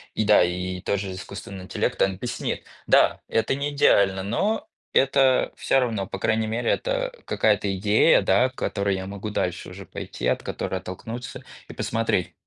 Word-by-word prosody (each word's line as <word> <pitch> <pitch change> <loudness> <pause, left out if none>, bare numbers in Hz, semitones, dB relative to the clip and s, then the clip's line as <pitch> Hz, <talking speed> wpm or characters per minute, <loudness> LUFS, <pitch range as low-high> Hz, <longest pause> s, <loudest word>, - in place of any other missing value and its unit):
И 110 - +1
да, 105 -3 +6
и 90 +1 -2
тоже 100 0 -2
искусственный 95 0 -8
интеллект, - - -2
он 95 - +3
объяснит. 120 +6 -4 0.2
Да, - - +4
это 115 - +1
не 140 +1 -2
идеально, 100 -9 +3
но 160 - -1 0.3
это 135 -1 +3
всё 135 - +2
равно, 115 -6 -1
по - - -6
крайней 110 0 +1
мере, 115 +2 -1
это - - -1
какая-то 105 -2 +1
идея, 105 +2 +4
да, 100 +7 +3
к 130 - -23
которой 100 -4 -1
я 95 0 -5
могу 100 +2 -5
дальше 90 -5 -2
уже 95 +1 -10
пойти, - - -5
от - - 0
которой - - -3
оттолкнуться 115 +6 -7 0.3
и - - -8
посмотреть. 115 -5 -1
105 Hz, 170 wpm, -24 LUFS, 95-120 Hz, 0.3 s, да